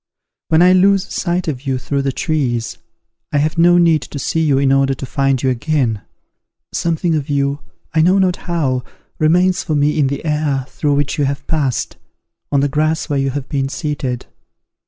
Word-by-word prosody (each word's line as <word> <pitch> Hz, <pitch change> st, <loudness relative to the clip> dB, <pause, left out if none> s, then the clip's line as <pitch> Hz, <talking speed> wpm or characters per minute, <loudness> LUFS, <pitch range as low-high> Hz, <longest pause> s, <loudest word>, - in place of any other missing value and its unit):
When 160 Hz, +1 st, +4 dB
I 180 Hz, +1 st, +6 dB
lose 195 Hz, +1 st, +3 dB
sight 180 Hz, -1 st, -1 dB
of 140 Hz, -2 st, -4 dB
you 130 Hz, -1 st, 0 dB
through 140 Hz, +2 st, -2 dB
the 135 Hz, 0 st, -1 dB
trees, 130 Hz, -, -2 dB, 0.5 s
I -, -, +1 dB
have 155 Hz, +3 st, 0 dB
no 175 Hz, +1 st, +6 dB
need 165 Hz, -3 st, +4 dB
to 145 Hz, -, -8 dB
see 140 Hz, +4 st, -1 dB
you 145 Hz, -4 st, +2 dB
in 135 Hz, 0 st, +2 dB
order 135 Hz, 0 st, +2 dB
to 135 Hz, -, -6 dB
find 135 Hz, -1 st, 0 dB
you 130 Hz, -, +2 dB
again. 125 Hz, -4 st, -1 dB, 0.7 s
Something 170 Hz, 0 st, 0 dB
of 150 Hz, -3 st, -2 dB
you, 140 Hz, 0 st, 0 dB, 0.3 s
I 160 Hz, -, +3 dB
know 180 Hz, +4 st, +4 dB
not 185 Hz, -2 st, +2 dB
how, 135 Hz, -7 st, 0 dB, 0.4 s
remains 180 Hz, +4 st, +3 dB
for 155 Hz, -, -1 dB
me 150 Hz, +1 st, +1 dB
in 140 Hz, -, +3 dB
the 140 Hz, +3 st, -4 dB
air 150 Hz, -4 st, 0 dB
through 145 Hz, -2 st, 0 dB
which 145 Hz, +1 st, -1 dB
you 145 Hz, -, +2 dB
have 140 Hz, +1 st, -3 dB
passed, 145 Hz, -6 st, -1 dB, 0.5 s
on 140 Hz, -1 st, +3 dB
the 145 Hz, -, +2 dB
grass 155 Hz, +4 st, 0 dB
where 140 Hz, -, +1 dB
you 135 Hz, 0 st, 0 dB
have 135 Hz, 0 st, -4 dB
been 135 Hz, -3 st, -1 dB
seated. 140 Hz, -6 st, -3 dB
145 Hz, 195 wpm, -17 LUFS, 135-160 Hz, 0.7 s, I